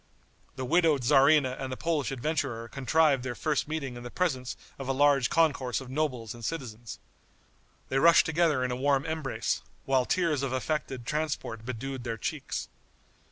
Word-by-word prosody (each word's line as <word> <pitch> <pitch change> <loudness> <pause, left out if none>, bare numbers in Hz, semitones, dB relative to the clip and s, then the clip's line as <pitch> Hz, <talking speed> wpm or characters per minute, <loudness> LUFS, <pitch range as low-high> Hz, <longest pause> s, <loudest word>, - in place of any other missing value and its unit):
The 130 -1 -4
widowed 160 -2 +3
tzarina 135 0 +5
and 130 -1 -4
the 130 - -4
Polish 160 -5 -1
adventurer 130 -4 -2
contrived 140 +2 +2
their 125 -1 -4
first 150 -2 -1
meeting 145 -5 -4
in 120 - -8
the 120 - -7
presence 130 -6 -1 0.2
of 135 - -5
a 135 - +1
large 140 -2 +4
concourse 140 -8 +2
of 130 -1 -9
nobles 130 -7 -2
and 120 -1 -12
citizens. 120 -6 -5 0.9
They 135 - +1
rushed 170 +4 +6
together 160 -5 +2
in 125 - -1
a - - -1
warm 135 +1 +1
embrace, 160 -5 -2 0.2
while 130 -2 +2
tears 165 -5 +1
of 135 -2 -2
affected 130 -2 -2
transport 145 -7 -3
bedewed 130 +1 -5
their 115 -2 -3
cheeks. - - -4
135 Hz, 165 wpm, -29 LUFS, 125-155 Hz, 0.9 s, rushed